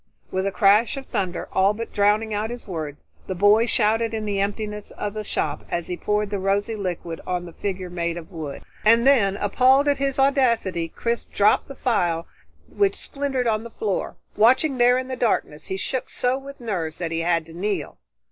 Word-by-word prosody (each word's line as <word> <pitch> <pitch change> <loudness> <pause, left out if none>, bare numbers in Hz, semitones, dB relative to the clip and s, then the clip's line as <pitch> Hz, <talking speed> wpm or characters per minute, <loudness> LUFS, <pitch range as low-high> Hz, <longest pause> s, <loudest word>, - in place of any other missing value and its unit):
With 190 +1 0
a - - 0
crash 210 +5 +4
of 270 - -6
thunder 185 -6 -3
all 195 +2 +3
but 230 +1 -6
drowning 210 +1 +2
out 210 +2 -1
his 240 -1 -7
words, 155 -6 -6 0.2
the 190 - -3
boy 205 +5 +5
shouted 225 0 +2
in 215 -1 -3
the 200 -1 -1
emptiness 210 +1 -3
of 205 -1 -5
the 215 0 -4
shop 150 -7 -1
as 170 -1 -2
he 180 - -3
poured 210 +2 -1
the 200 - -1
rosy 200 +4 0
liquid 175 -4 -4
on 180 -1 -2
the 170 - -10
figure 185 -2 -4
made 170 -1 -2
of 170 +2 -9
wood. 155 -5 -6 0.2
And 230 +3 +5
then, 210 -8 +4
appalled 260 +7 +4
at 285 -1 +2
his 275 -1 0
audacity, 235 -11 +2
Chris 235 +8 -3
dropped 205 +1 +2
the 275 - -9
phial 175 -10 0 0.4
which 400 -1 +1
splintered 275 -3 -2
on 220 -1 +1
the 235 - -8
floor. 210 -4 -3 0.2
Watching 260 +5 +4
there 245 +1 +5
in 255 0 -3
the 260 - -3
darkness, 220 -10 -1
he 190 - -3
shook 255 +6 -3
so 250 +1 0
with 275 +1 -9
nerves 180 -9 -3
that 170 -2 -3
he 165 - -1
had 165 -1 +1
to 165 - -13
kneel. 200 +4 -3
210 Hz, 205 wpm, -23 LUFS, 180-240 Hz, 0.4 s, boy